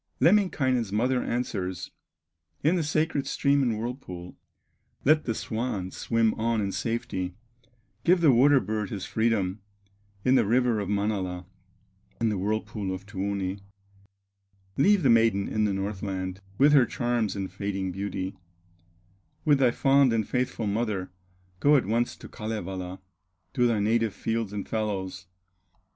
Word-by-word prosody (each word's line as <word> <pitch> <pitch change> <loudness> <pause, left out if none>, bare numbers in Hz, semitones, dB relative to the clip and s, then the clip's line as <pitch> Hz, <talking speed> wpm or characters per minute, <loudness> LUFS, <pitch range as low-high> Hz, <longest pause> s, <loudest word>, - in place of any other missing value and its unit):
Lemminkainen's 130 - +3
mother 125 +4 +1
answers, 95 -7 -3 0.7
In 160 +5 +4
the 175 - +1
sacred 155 -2 0
stream 140 0 +2
and 120 -5 +1
whirlpool. 110 -7 -6 0.7
"Let 155 +2 +4
the 115 - -1
swan 110 -6 -3
swim 115 -1 +1
on 115 0 +1
in 100 -2 -1
safety, 95 -5 -3 0.7
Give 180 +1 +4
the 160 -4 +6
water 135 +3 +6
bird 105 -2 -3
his 100 -3 -5
freedom, 110 -4 0 0.6
In 125 - +4
the 125 -4 +4
river 120 -1 +2
of 100 -2 -3
Manala, 100 -3 -1 0.7
In 115 - +2
the 105 - -1
whirlpool 105 0 -2
of 95 +1 -6
Tuoni; 100 -1 -3 1.2
Leave 195 +5 +4
the 135 - +4
maiden 115 -4 +3
in 110 0 0
the 100 - 0
Northland, 95 -1 -3 0.2
With 145 +2 +5
her 130 -5 +6
charms 120 -4 -1
and 95 -1 -4
fading 95 -2 -3
beauty; 95 0 -4 1.1
With 145 -3 +4
thy 130 -2 +5
fond 135 0 +4
and 110 -3 0
faithful 125 -2 -1
mother, 100 -3 -1 0.5
Go 145 +7 +5
at 135 - +3
once 115 +4 0
to - - -11
Kalevala, 95 -4 -5 0.5
To 125 -1 +3
thy 115 -3 +1
native 110 0 +1
fields 115 -2 -2
and 105 -1 -5
fallows. 95 -4 -3
110 Hz, 140 wpm, -27 LUFS, 95-125 Hz, 1.2 s, the